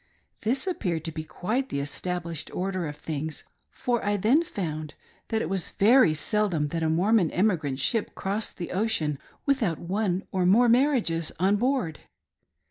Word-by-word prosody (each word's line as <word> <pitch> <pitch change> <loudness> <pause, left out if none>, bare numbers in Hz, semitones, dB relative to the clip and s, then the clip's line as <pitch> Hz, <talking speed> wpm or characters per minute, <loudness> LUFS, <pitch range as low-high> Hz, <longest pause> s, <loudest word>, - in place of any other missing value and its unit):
This 255 - +1
appeared 180 - -2
to 165 - -3
be 155 0 -5
quite 230 +12 -2
the 140 - -2
established 170 +2 -4
order 185 -2 -2
of 150 - -6
things, 155 0 -4 0.3
for 240 -2 -1
I 205 0 +1
then 230 - +4
found 155 - -4 0.3
that 220 0 0
it - - -2
was 190 -1 -1
very 215 -5 +5
seldom 170 -3 0
that 165 +2 -2
a 160 - +1
Mormon 180 +2 +3
emigrant 165 -9 0
ship 215 +11 0
crossed 205 +3 -2
the 175 - -5
ocean 180 -8 0 0.3
without 235 - +1
one 190 +1 -1
or 185 -2 +1
more 230 +6 +6
marriages 235 - +2
on 190 +3 +3
board. 245 - 0
185 Hz, 160 wpm, -27 LUFS, 160-220 Hz, 0.3 s, more